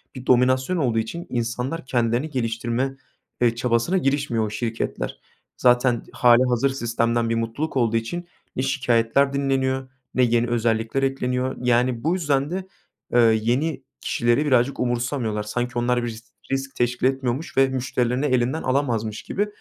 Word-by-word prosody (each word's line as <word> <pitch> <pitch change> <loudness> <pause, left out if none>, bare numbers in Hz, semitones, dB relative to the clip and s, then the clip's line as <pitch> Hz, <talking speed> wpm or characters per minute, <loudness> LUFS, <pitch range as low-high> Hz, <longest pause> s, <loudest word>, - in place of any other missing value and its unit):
bir 130 -1 -8
dominasyon 130 +7 +3
olduğu 120 -8 +1
için 170 +11 -4
insanlar 125 +6 -3
kendilerini 120 +3 0
geliştirme, 120 +1 -2 0.4
eee, 120 -1 +3
çabasına 120 +9 +1
girişmiyor 135 -8 0
o - - -3
şirketler. 115 +1 -3 0.4
Zaten 125 -1 +3
hâlihazır 125 +1 +4
sistemden 115 -2 0
bir 115 - +1
mutluluk 115 +7 -2
olduğu 115 -2 +2
için 175 +10 -4 0.3
ne - - -1
şikâyetler 135 0 +2
dinleniyor 135 -1 0 0.2
ne 130 - +3
yeni 120 0 +2
özellikler 115 +2 0
ekleniyor. 130 -1 -1
Yani 125 -1 +1
bu 160 +4 +2
yüzden 145 -6 0
de, 185 +1 -4 0.5
ııı, 115 -2 +6
yeni 130 +7 0 0.2
kişileri 120 +5 +1
birazcık 130 -1 +2
umursamıyorlar. 120 -3 -1
Sanki 120 +3 -2
onlar 120 0 +1
bir - - -2
risk 115 +1 -9 0.3
risk 135 0 -2
teşkil 120 +1 0
etmiyormuş 130 +2 -2
ve 135 0 +6
müşterilerini 130 0 -1
elinden 130 +2 +1
alamazmış 120 -5 -1
gibi. 205 +2 -1
125 Hz, 145 wpm, -23 LUFS, 115-135 Hz, 0.5 s, ııı